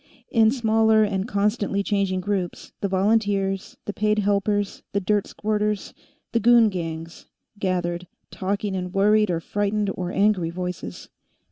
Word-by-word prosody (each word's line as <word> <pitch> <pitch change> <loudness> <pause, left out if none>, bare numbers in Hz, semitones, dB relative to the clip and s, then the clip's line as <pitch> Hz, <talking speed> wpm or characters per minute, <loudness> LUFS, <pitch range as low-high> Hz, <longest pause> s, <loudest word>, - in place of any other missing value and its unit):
In 225 -3 +5
smaller 220 -2 +3
and 200 -1 -1
constantly 205 -2 0
changing 195 -2 0
groups, 185 -2 -3
the 200 - +1
volunteers, 195 -1 0
the 205 - -4
paid 215 +1 +1
helpers, 205 0 0
the 200 - +2
dirt 205 +1 +1
squirters, 210 -1 -2 0.4
the 230 - +2
goon 235 0 +6
gangs, 165 -3 -6 0.3
gathered, 180 -2 -1 0.2
talking 200 +1 -2
in 180 -1 -4
worried 210 +1 +4
or 170 -2 0
frightened 205 +3 -1
or 180 -1 -4
angry 195 -4 +2
voices. 180 - -6
200 Hz, 135 wpm, -24 LUFS, 185-210 Hz, 0.4 s, goon